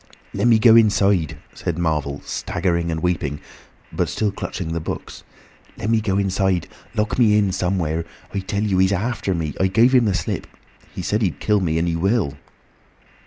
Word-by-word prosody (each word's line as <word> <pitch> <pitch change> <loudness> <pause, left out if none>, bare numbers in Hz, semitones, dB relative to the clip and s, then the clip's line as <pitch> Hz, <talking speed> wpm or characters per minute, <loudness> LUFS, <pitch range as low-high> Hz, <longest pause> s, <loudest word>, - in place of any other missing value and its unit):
"Lemme 120 -2 +4
go 115 0 +6
inside," 100 -7 +3 0.2
said 85 - -4
Marvel, 75 -4 -1
staggering 85 -3 -1
and 80 0 -3
weeping, 75 -5 -1 0.5
but - - 0
still 105 -2 0
clutching 90 -4 -5
the 85 - -1
books. 80 - -6 0.6
"Lemme 110 +1 +1
go 100 -2 0
inside. 95 -2 0 0.3
Lock 105 +2 -1
me 105 -3 +5
in—somewhere. 90 -5 0 0.3
I 100 - -1
tell 100 +2 -2
you 95 -3 +1
he's 95 +1 +4
after 100 -1 -1
me. 80 -4 -3
I 95 - +3
give 115 +7 +4
him 125 -3 +5
the 100 -3 +1
slip. - - -3 0.4
He 90 - -6
said 105 +5 0
he'd 90 -9 -1
kill 105 -1 +2
me 80 -4 0
and 85 +1 +1
he 85 - 0
will." 95 - 0
95 Hz, 170 wpm, -21 LUFS, 85-105 Hz, 0.6 s, go